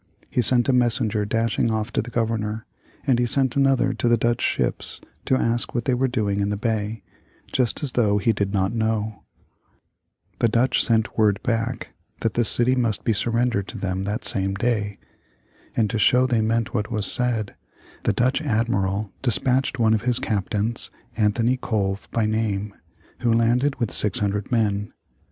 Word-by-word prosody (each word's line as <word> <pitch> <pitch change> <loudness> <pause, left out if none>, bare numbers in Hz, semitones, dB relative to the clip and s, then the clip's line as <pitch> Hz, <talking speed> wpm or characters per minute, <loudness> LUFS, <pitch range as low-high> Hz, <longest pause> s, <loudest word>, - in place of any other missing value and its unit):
He 125 - +1
sent 120 +1 +3
a 135 - +3
messenger 115 -4 +1
dashing 115 +1 0
off 110 +1 -2
to - - +1
the 120 - -8
Governor, 110 -2 -2 0.4
and 130 -4 +2
he 120 - +1
sent 130 0 +3
another 135 -2 +2
to 115 +1 -2
the 120 - +4
Dutch 120 +1 0
ships - - -1 0.3
to 130 - +2
ask 120 0 0
what 120 -1 -1
they 130 - +1
were 130 +2 +1
doing 105 -5 -1
in 100 0 0
the 105 - -2
bay, 110 0 -3 0.5
just 125 +2 0
as 140 - +1
though 105 -5 +2
he 105 +3 +1
did 100 -1 -2
not 95 0 0
know. 110 -2 -2 1.2
The - - +3
Dutch 120 +3 +2
sent 110 -1 +1
word 105 -2 +3
back 115 +1 -2 0.3
that 115 - 0
the 120 - +1
city 120 +3 +5
must 115 -5 0
be 115 - +1
surrendered 115 -2 0
to - - -8
them 95 0 -3
that 105 +4 -3
same 95 0 +2
day. 105 -2 -1 0.8
And 110 -2 +3
to 115 - -2
show 125 +4 +4
they 120 -3 +1
meant 115 +1 -1
what 105 - -2
was 105 -3 0
said, 120 -4 +2 0.5
the - - +1
Dutch 125 +8 +1
admiral 105 -6 -1
despatched 130 +1 +1
one 110 -2 +3
of 110 - +1
his 120 +1 +1
captains, 105 +2 -1 0.3
Anthony 115 +3 +1
Colve 100 -5 -2
by 115 -2 0
name, 105 -2 -2 0.5
who 120 - +1
landed 120 +5 +2
with 120 -4 -1
600 105 +1 0
men. 105 -3 0
115 Hz, 175 wpm, -23 LUFS, 105-120 Hz, 1.2 s, city